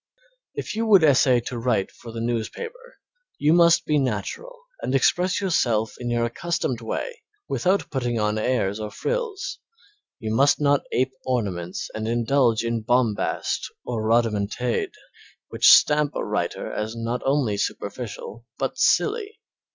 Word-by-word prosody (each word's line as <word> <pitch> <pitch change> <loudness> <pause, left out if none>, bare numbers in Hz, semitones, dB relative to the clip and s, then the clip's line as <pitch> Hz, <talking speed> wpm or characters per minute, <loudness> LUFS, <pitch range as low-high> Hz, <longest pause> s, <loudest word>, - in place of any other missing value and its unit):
If - - -4
you 225 +1 -1
would 195 -6 +6
essay 130 -4 +5
to 120 0 -5
write 115 -5 0
for 115 - -11
the 115 0 -5
newspaper 460 - -4 0.4
you 150 +2 +3
must 170 -1 +5
be 150 -1 +2
natural 135 - -3 0.2
and 130 - -1
express 180 +7 +2
yourself 120 - +1
in 120 -1 -4
your 120 0 +1
accustomed 125 -1 -2
way 480 - -4 0.3
without 190 +2 0
putting 120 -4 -1
on 105 0 0
airs 110 -4 0
or 105 -1 -4
frills; 460 - -3 0.6
you 110 -1 -4
must 140 +5 +4
not 145 -1 +3
ape 130 +1 0
ornaments 95 -8 -2
and 110 0 -4
indulge 120 0 +2
in 115 -1 -1
bombast 115 -2 0
or 120 -3 -2
rhodomontade 115 +1 0 0.6
which - - +4
stamp 150 0 +5
a - - -2
writer - - -2
as 110 +2 -4
not 115 +2 -3
only 135 -6 +1
superficial 115 +3 -5
but - - -3
silly. 435 -1 +1
125 Hz, 145 wpm, -24 LUFS, 115-155 Hz, 0.6 s, would